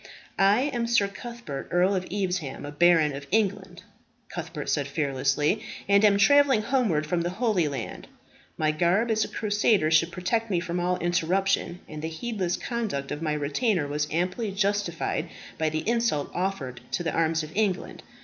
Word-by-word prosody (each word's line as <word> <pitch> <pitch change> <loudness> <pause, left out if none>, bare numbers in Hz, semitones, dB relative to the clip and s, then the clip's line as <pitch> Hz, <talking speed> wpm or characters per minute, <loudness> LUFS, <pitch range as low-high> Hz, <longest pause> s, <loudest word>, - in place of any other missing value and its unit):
"I 200 +4 +5
am 235 -1 -1
Sir 235 -4 +3
Cuthbert, 235 - -7
Earl 180 +3 +3
of 185 -1 -2
Evesham, 180 -9 -2
a 145 - -6
baron 160 -2 +4
of 140 0 -8
England," 190 -3 -1 0.5
Cuthbert 160 -4 -5
said 145 -2 0
fearlessly, 140 0 0 0.3
"and 200 +1 +4
am 205 -2 +5
travelling 265 +1 +5
homeward 215 - +1
from 170 +3 0
the 175 - -1
Holy 200 -4 +1
Land. 135 -6 -6 0.5
My 155 -1 +2
garb 180 +9 +2
as 220 -1 +2
a - - -3
crusader 205 -6 +1
should 165 +2 +4
protect 205 +6 -1
me 180 -4 +1
from 175 0 -3
all 180 +1 0
interruption; 180 +1 0
and 155 -1 -7
the 160 - -3
heedless 185 0 -2
conduct 215 - -3
of 145 +1 -4
my 155 -2 0
retainer 150 - 0
was 150 +1 -1
amply 185 +6 -1
justified 195 -4 -1 0.3
by 160 -1 +2
the 155 +4 -3
insult 230 -11 0
offered 165 -10 -3
to 175 - 0
the 165 - -2
arms 165 -1 +1
of 155 +1 -10
England. 200 -3 -1
180 Hz, 170 wpm, -26 LUFS, 155-205 Hz, 0.5 s, I